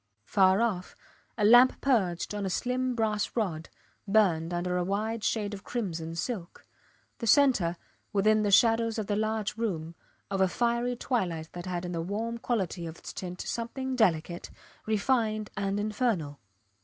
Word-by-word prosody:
Far 190 Hz, 0 st, +4 dB
off, 190 Hz, -6 st, -2 dB, 0.4 s
a 210 Hz, -, +2 dB
lamp 245 Hz, +4 st, +7 dB
perched 200 Hz, -10 st, +1 dB
on 205 Hz, -1 st, -3 dB
a 190 Hz, -, -1 dB
slim 250 Hz, +5 st, -1 dB
brass 215 Hz, -2 st, -1 dB
rod, 175 Hz, -9 st, -2 dB, 0.4 s
burned 180 Hz, -6 st, +3 dB
under 180 Hz, +1 st, -1 dB
a 180 Hz, -, +1 dB
wide 215 Hz, +4 st, -2 dB
shade 210 Hz, -2 st, 0 dB
of 195 Hz, -, -8 dB
crimson 165 Hz, -8 st, -4 dB
silk: 170 Hz, +1 st, -5 dB, 0.5 s
the 230 Hz, -, -3 dB
centre, 220 Hz, -, +4 dB, 0.3 s
within 215 Hz, +1 st, +3 dB
the 210 Hz, -, +1 dB
shadows 225 Hz, +2 st, +4 dB
of 215 Hz, -, -2 dB
the 205 Hz, -, -1 dB
large 215 Hz, 0 st, -1 dB
room, 170 Hz, -8 st, -2 dB, 0.4 s
of 195 Hz, -1 st, 0 dB
a 190 Hz, -, +5 dB
fiery 235 Hz, +4 st, 0 dB
twilight 175 Hz, -11 st, -2 dB
that 175 Hz, +1 st, -7 dB
had 180 Hz, -1 st, -3 dB
in 175 Hz, -, -4 dB
the 165 Hz, -1 st, -2 dB
warm 220 Hz, +6 st, -3 dB
quality 190 Hz, -8 st, -2 dB
of 165 Hz, +1 st, -8 dB
its -, -, -9 dB
tint 180 Hz, -1 st, -6 dB
something 260 Hz, +3 st, -3 dB
delicate, 175 Hz, -6 st, +1 dB, 0.4 s
refined 215 Hz, -1 st, +1 dB
and 200 Hz, 0 st, -1 dB
infernal. 205 Hz, -, -1 dB
205 Hz, 160 wpm, -29 LUFS, 180-230 Hz, 0.5 s, lamp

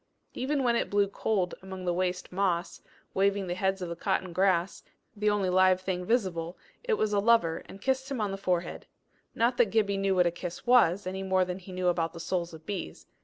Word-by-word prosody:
Even 270 Hz, +2 st, -1 dB
when 240 Hz, -2 st, +3 dB
it -, -, 0 dB
blew 200 Hz, 0 st, +2 dB
cold 195 Hz, -2 st, -1 dB
along 190 Hz, -1 st, -8 dB
the 175 Hz, -, +1 dB
waste 180 Hz, 0 st, -2 dB
moss, 180 Hz, -2 st, -1 dB, 0.3 s
waving 195 Hz, 0 st, +1 dB
the 175 Hz, -, -2 dB
heads 190 Hz, +1 st, -1 dB
of 175 Hz, -, -4 dB
the 170 Hz, -, -4 dB
cotton 175 Hz, +1 st, -1 dB
grass, 185 Hz, 0 st, +1 dB, 0.3 s
the 210 Hz, 0 st, +1 dB
only 205 Hz, -2 st, +1 dB
live 185 Hz, 0 st, +4 dB
thing 185 Hz, -1 st, -3 dB
visible, 180 Hz, -7 st, -1 dB, 0.3 s
it 475 Hz, -2 st, +1 dB
was 215 Hz, -, 0 dB
a 205 Hz, -, +3 dB
lover, 205 Hz, -7 st, +3 dB
and 195 Hz, -, -12 dB
kissed 265 Hz, 0 st, 0 dB
him 270 Hz, -3 st, -3 dB
on 210 Hz, -2 st, -1 dB
the -, -, -3 dB
forehead. 180 Hz, -3 st, -2 dB, 0.5 s
Not 240 Hz, +2 st, +2 dB
that 235 Hz, -4 st, +4 dB
Gibbie 200 Hz, -2 st, +1 dB
knew 195 Hz, -1 st, +1 dB
what 180 Hz, -1 st, +4 dB
a 175 Hz, -, +2 dB
kiss 175 Hz, 0 st, -7 dB
was, 205 Hz, -6 st, +4 dB
any 190 Hz, +1 st, -4 dB
more 190 Hz, -1 st, +2 dB
than 180 Hz, +1 st, -5 dB
he 185 Hz, 0 st, -12 dB
knew 185 Hz, 0 st, -1 dB
about 170 Hz, -2 st, +1 dB
the 170 Hz, -, -9 dB
souls 170 Hz, +1 st, -2 dB
of 160 Hz, -1 st, -12 dB
bees. 185 Hz, -, -5 dB
190 Hz, 220 wpm, -29 LUFS, 180-205 Hz, 0.5 s, live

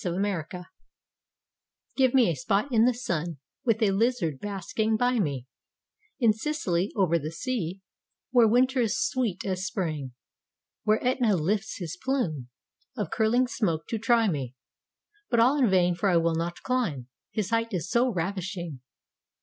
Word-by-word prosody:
_ -, -, -10 dB, 0.2 s
BASKING 180 Hz, -3 st, -3 dB, 1.3 s
Give 260 Hz, -1 st, +3 dB
me 250 Hz, -4 st, +6 dB
a -, -, -2 dB
spot 200 Hz, -, 0 dB
in 225 Hz, -1 st, +5 dB
the 250 Hz, -, +4 dB
sun, 170 Hz, -, -3 dB, 0.3 s
With 225 Hz, -2 st, +2 dB
a 200 Hz, -, +4 dB
lizard 195 Hz, -, 0 dB
basking 205 Hz, +2 st, -1 dB
by 245 Hz, +1 st, +2 dB
me, 140 Hz, -, -1 dB, 0.7 s
In 230 Hz, -4 st, +5 dB
Sicily, 210 Hz, -, -1 dB
over 170 Hz, -4 st, +2 dB
the 150 Hz, 0 st, -4 dB
sea, 190 Hz, 0 st, -3 dB, 0.5 s
Where 240 Hz, -2 st, +6 dB
Winter 255 Hz, +3 st, +3 dB
is 230 Hz, +2 st, 0 dB
sweet 250 Hz, -8 st, -1 dB
as 190 Hz, -1 st, -2 dB
Spring, 155 Hz, -, -3 dB, 0.7 s
Where 215 Hz, +3 st, +2 dB
Etna 250 Hz, -5 st, +2 dB
lifts 195 Hz, +6 st, -1 dB
his 175 Hz, -1 st, -6 dB
plume 170 Hz, -, -1 dB, 0.5 s
Of 205 Hz, -7 st, -3 dB
curling 235 Hz, +3 st, +2 dB
smoke 195 Hz, -10 st, -1 dB
to 225 Hz, -, -2 dB
try 230 Hz, 0 st, +3 dB
me, 135 Hz, -8 st, -3 dB, 0.7 s
But 235 Hz, -, +2 dB
all 250 Hz, +5 st, +5 dB
in 235 Hz, -, +4 dB
vain 180 Hz, -2 st, +3 dB
for 175 Hz, +3 st, 0 dB
I 175 Hz, -, +4 dB
will 165 Hz, 0 st, +2 dB
not 170 Hz, +1 st, -3 dB
climb 185 Hz, -, -1 dB, 0.2 s
His 215 Hz, -1 st, -2 dB
height 230 Hz, 0 st, +1 dB
so 235 Hz, +10 st, +1 dB
ravishing. 175 Hz, -, -4 dB
200 Hz, 155 wpm, -27 LUFS, 170-235 Hz, 1.3 s, me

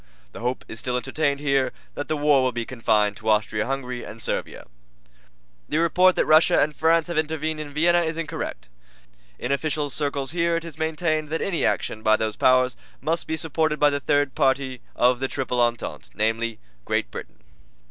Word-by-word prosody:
The -, -, -9 dB
hope 125 Hz, +2 st, -2 dB
is 115 Hz, -, -8 dB
still 125 Hz, +1 st, -1 dB
entertained 140 Hz, +2 st, -1 dB
here 140 Hz, -2 st, +1 dB, 0.2 s
that 145 Hz, -, -5 dB
the 155 Hz, -, -1 dB
war 145 Hz, -2 st, +4 dB
will 130 Hz, 0 st, +1 dB
be 120 Hz, -1 st, -3 dB
confined 105 Hz, -4 st, +1 dB
to 110 Hz, -1 st, -3 dB
Austria 110 Hz, 0 st, +1 dB
Hungary 125 Hz, -2 st, -3 dB
and 110 Hz, +2 st, -9 dB
Servia. -, -, -3 dB, 1.0 s
The -, -, 0 dB
report 180 Hz, +3 st, +4 dB
that -, -, +2 dB
Russia 155 Hz, +1 st, +5 dB
and 150 Hz, 0 st, +1 dB
France 165 Hz, 0 st, +3 dB
have 170 Hz, -2 st, -1 dB
intervened 155 Hz, 0 st, -2 dB
in 150 Hz, -1 st, -5 dB
Vienna 170 Hz, +4 st, +3 dB
is 160 Hz, -1 st, -2 dB
incorrect. -, -, -5 dB, 0.7 s
In 125 Hz, -, -3 dB
official 145 Hz, 0 st, -1 dB
circles 140 Hz, -1 st, -1 dB
here 170 Hz, 0 st, +1 dB
it 165 Hz, 0 st, -3 dB
is 160 Hz, -2 st, -9 dB
maintained 155 Hz, -1 st, -1 dB
that 160 Hz, +1 st, -1 dB
any 175 Hz, -4 st, -1 dB
action 110 Hz, -, 0 dB
by 110 Hz, 0 st, +4 dB
those 110 Hz, -1 st, -2 dB
powers 130 Hz, 0 st, +3 dB, 0.2 s
must 165 Hz, +2 st, -1 dB
be 160 Hz, -, -2 dB
supported 160 Hz, -1 st, 0 dB
by 150 Hz, 0 st, +5 dB
the 145 Hz, -, -1 dB
third 145 Hz, 0 st, +1 dB
party 130 Hz, -3 st, 0 dB, 0.2 s
to 125 Hz, +1 st, +5 dB
the 130 Hz, +2 st, -3 dB
Triple 125 Hz, -2 st, -1 dB
Entente, 120 Hz, 0 st, -1 dB
namely, 115 Hz, +1 st, 0 dB, 0.3 s
Great -, -, -1 dB
Britain. -, -, -9 dB
140 Hz, 190 wpm, -24 LUFS, 125-155 Hz, 1.0 s, Russia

